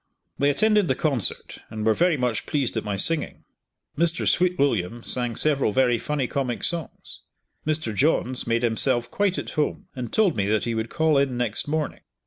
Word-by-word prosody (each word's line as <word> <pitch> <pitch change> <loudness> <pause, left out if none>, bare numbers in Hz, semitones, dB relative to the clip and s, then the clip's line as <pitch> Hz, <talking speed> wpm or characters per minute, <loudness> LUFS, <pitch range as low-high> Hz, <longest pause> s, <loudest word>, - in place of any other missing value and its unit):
They 140 - +3
attended 210 +5 +3
the 130 - +1
concert 135 -8 -1
and 110 -1 -5
were 110 - +4
very 170 +4 +2
much 125 -4 -2
pleased 140 -6 -1
at 110 - -1
my 105 -1 -3
singing. 160 +11 0 0.5
Mr. 170 +2 +1
Sweetwilliam 135 - +1
sang 120 -2 -2
several 140 -6 +2
very 120 0 +2
funny 145 +1 -2
comic 125 -2 -3
songs. 170 -2 -4 0.5
Mr. 155 -7 0
Johns 130 0 0
made 115 +1 +1
himself 120 +1 +1
quite 200 -2 0
at - - -5
home, 150 -2 -2
and 125 -3 -5
told 205 -7 +2
me 100 -2 0
that 110 +1 +1
he 120 - -2
would 110 0 -3
call 160 -3 +2
in 135 -3 0
next 120 0 -1
morning. 150 -1 -2
130 Hz, 180 wpm, -24 LUFS, 115-155 Hz, 0.5 s, were